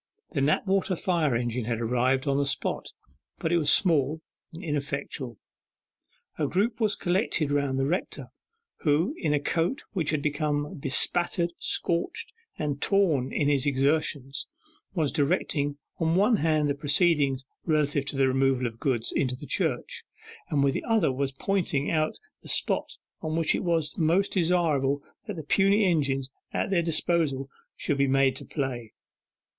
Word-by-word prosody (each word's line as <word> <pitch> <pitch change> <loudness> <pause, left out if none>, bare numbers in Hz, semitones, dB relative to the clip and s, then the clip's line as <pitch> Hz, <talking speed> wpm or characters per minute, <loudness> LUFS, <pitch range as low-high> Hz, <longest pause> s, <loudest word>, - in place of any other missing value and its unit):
The 140 - -1
Knapwater 190 +6 +2
fire 165 -7 +1
engine 120 0 -1
had 115 -1 -1
arrived 125 +3 +1
on 140 -1 +1
the 140 - +2
spot, - - -2 0.5
but 160 - -2
it 175 - +4
was 150 -2 +3
small, 160 -3 +2 0.3
and 165 +4 -9
ineffectual. 140 - -3 1.0
A 150 - +1
group 215 - 0
was 215 -3 +2
collected 175 -5 0
round 140 -2 +1
the 135 - +1
rector, 175 +7 -3 0.5
who 160 - +1
in 155 - -1
a 150 - +3
coat 165 - -1
which 170 -7 -1
had 150 -2 0
become 150 0 -1
bespattered, 170 +5 0
scorched, 170 - -1 0.2
and 145 -2 -2
torn 160 -11 +2
in 145 - +1
his 145 -2 +2
exertions, 140 -1 0 0.5
was 155 -5 +1
directing 145 -1 0 0.2
on 165 0 +2
one 210 +4 +4
hand 155 -3 +2
the 140 - +1
proceedings 145 -2 +2 0.2
relative 150 -3 +1
to 145 - -3
the 135 -1 +4
removal 130 -1 +2
of 115 -1 -4
goods 120 -5 0
into 125 -2 0
the 145 - -10
church, - - -1 0.5
and 145 -2 +2
with 140 -1 +3
the - - -3
other 220 - +2
was 135 +1 -1
pointing 155 -2 -1
out 155 -1 0 0.2
the - - -6
spot - - +1 0.2
on 155 0 -2
which 165 -1 +2
it - - -1
was 165 -3 0
most 170 +5 +2
desirable 160 -6 +2 0.2
that 210 - -4
the 160 - -6
puny 195 +6 +3
engines 135 -6 +1 0.2
at 205 - -1
their 180 -3 +3
disposal 160 -5 0 0.2
should 145 -2 -2
be 140 - +4
made 135 0 +3
to - - -8
play. 125 -6 -4
150 Hz, 160 wpm, -27 LUFS, 135-170 Hz, 1.0 s, it